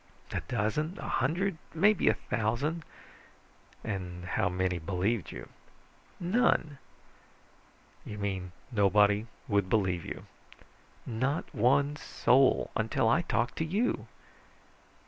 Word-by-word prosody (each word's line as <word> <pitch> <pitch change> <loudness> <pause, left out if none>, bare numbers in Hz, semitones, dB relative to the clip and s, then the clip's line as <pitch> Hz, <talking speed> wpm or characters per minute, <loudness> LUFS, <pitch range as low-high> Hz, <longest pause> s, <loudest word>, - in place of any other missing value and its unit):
"A - - -1
dozen, 125 - -1
a - - -5
hundred, 165 +6 0 0.2
maybe 205 +4 +4
a - - +3
thousand." 120 +10 -1 1.0
"And 90 -4 -4
how 90 +1 0
many 90 -1 0
believed 95 +5 -1
you?" - - -8 0.7
"None." 175 - +2 1.2
"You 105 - -7
mean 95 -3 -3 0.2
nobody 105 0 +4 0.2
would 100 -4 +1
believe 95 -5 +1
you?" - - -7 0.8
"Not 130 +7 -2
one 140 +6 +3
soul. 135 -3 +3
Until 110 +1 +1
I 160 +9 +4
talked 120 -6 -1
to - - 0
you." 200 +10 0
115 Hz, 105 wpm, -30 LUFS, 100-150 Hz, 1.2 s, maybe